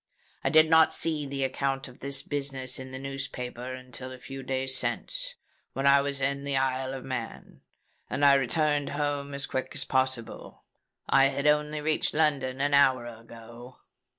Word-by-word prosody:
I - - +2
did 155 0 +6
not 160 0 +5
see 155 -3 -1
the 135 0 -2
account 135 +1 -1
of 125 - -15
this 140 0 0
business 135 -3 -2
in 130 0 -8
the 130 - -5
newspapers 130 -2 -5
until 130 0 -9
a 130 - -8
few 135 +1 -8
days 130 0 0
since, - - -1 0.4
when 135 - -2
I 140 0 +6
was 140 -1 -2
in 140 +1 0
the 140 -1 0
Isle 130 0 -1
of 130 - -8
Man; 125 -4 -6 0.5
and 145 - +1
I 140 - +8
returned 145 +2 +1
home 145 -1 -2
as 140 - -2
quick 130 - -4
as 145 - -2
possible. 130 -3 -2 0.4
I 135 0 +5 0.2
only 150 0 +2
reached 155 0 0
London 135 -4 +1
an 145 0 +1
hour 130 -3 +4
ago." 115 +1 -12
135 Hz, 170 wpm, -28 LUFS, 130-145 Hz, 0.5 s, I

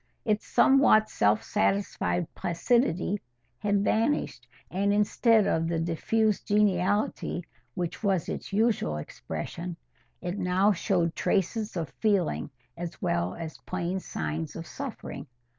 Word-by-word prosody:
Its 210 -1 0
somewhat 265 -6 +5
self 105 +1 +2
satisfied 95 -3 0
placidity 195 +1 +1 0.4
had 205 -1 +1
vanished, 220 - 0 0.2
and 200 +3 +1
instead 210 +1 +4
of 165 0 +1
the 165 0 0
diffused 205 +6 0
geniality 205 -2 +1 0.3
which 175 -3 -3
was 195 -6 +1
its - - -5
usual 205 - +1
expression, 170 - -6 0.4
it 180 +2 -4
now 185 +2 +3
showed 175 -3 +1
traces 205 +2 0
of 165 -2 -2
feeling 200 -10 +1 0.3
as 170 -1 -6
well 85 +1 0
as 160 -2 -7
plain 185 +1 -3
signs 80 - -4
of - - -6
suffering. - - -7
185 Hz, 120 wpm, -28 LUFS, 165-210 Hz, 0.4 s, somewhat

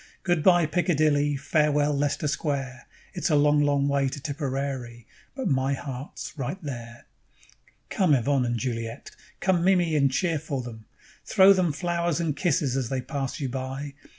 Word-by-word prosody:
Good 175 -3 +1
bye, 175 0 +5
Piccadilly, 150 -4 +1
Farewell, 150 0 +1
Lester 145 +1 0
Square: 140 -4 -3 0.3
It's 175 - -1
a 155 - +3
long, 145 0 +4
long 140 -1 +2
way 140 -1 +1
to 145 - -7
Tipperary, 135 -4 -4 0.3
But 265 -2 -3
my 135 0 +1
heart's 135 0 -7
right 140 +4 -4
there._ 120 -4 -7 0.9
"Come, 180 -7 +3
Yvonne 135 +1 +1
and 120 0 -1
Juliette! 115 -1 -4 0.3
Come, 185 -3 +2
Mimi, 175 -4 +3
and 140 -2 +3
cheer 165 +2 0
for 140 -4 -4
them! 110 -2 -9 0.4
Throw 195 +1 +6
them 185 -4 +1
flowers 170 +1 -1
and 160 -4 -1
kisses 145 -4 0
as 130 -4 -1
they 130 -1 -1
pass 135 0 -4
you 140 - -2
by. 135 +2 -5
145 Hz, 160 wpm, -26 LUFS, 130-160 Hz, 0.9 s, Throw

